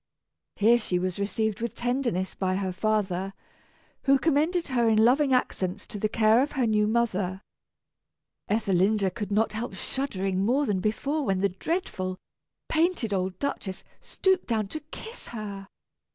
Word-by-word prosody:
Here 230 +4 +5
she 185 -5 0
was 185 +1 -2
received 210 +1 -1
with 235 - -3
tenderness 240 -7 -1
by 185 -1 -1
her 190 -1 -1
father, 195 -1 -1 0.7
who 275 0 +6
commended 320 +4 +1
her 240 -3 +2
in 220 0 +5
loving 270 +3 +4
accents 200 -6 0
to 205 - -7
the 215 - 0
care 220 +2 +4
of 285 - -1
her 265 -4 +1
new 210 -1 +2
mother. 205 -5 0 1.1
Ethelinda 200 -1 +2
could 210 0 -5
not 215 +2 +2
help 220 -2 -4
shuddering 195 -6 -2
more 260 +7 +2
than 205 -6 0
before 275 +10 -1
when 195 -6 0
the 200 - +3
dreadful, 185 - -3 0.5
painted 320 - +1
old 185 -1 -1
Duchess 195 -8 -3 0.2
stooped 380 -1 +1
down 220 -4 0
to 310 - -4
kiss 450 +7 -9
her. 200 -4 -6
215 Hz, 150 wpm, -27 LUFS, 195-255 Hz, 1.1 s, who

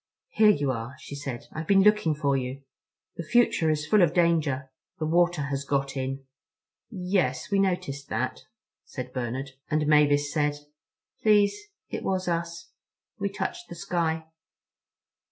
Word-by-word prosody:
"Here 215 - +5
you 145 -9 +2
are," 120 +2 -5
she 130 - -10
said. 135 -4 -6
"I've 155 0 -5
been 195 -1 +5
looking 210 -7 +4
for 140 -2 +1
you. 130 +1 -3 0.5
The 170 - -3
future 225 -3 +3
is 155 0 0
full 210 +5 +4
of 170 0 +3
danger. 155 -6 +1 0.3
The 155 - -2
water 175 -1 +2
has 140 0 -2
got 140 -1 -1
in." 135 0 -3 0.6
"Yes, 180 - -1
we 200 - +3
noticed 145 -8 -1
that," 125 +4 -2 0.4
said 125 -1 -7
Bernard. 130 +2 -3 0.2
And 155 0 +1
Mavis 145 -1 +3
said: 150 -2 +1 0.7
"Please, 210 -2 +5 0.4
it - - -4
was 185 -1 -1
us. 170 0 -3 0.5
We 200 0 0
touched 350 - -5
the - - -7
sky." 165 -3 -1
155 Hz, 150 wpm, -27 LUFS, 140-180 Hz, 0.7 s, Here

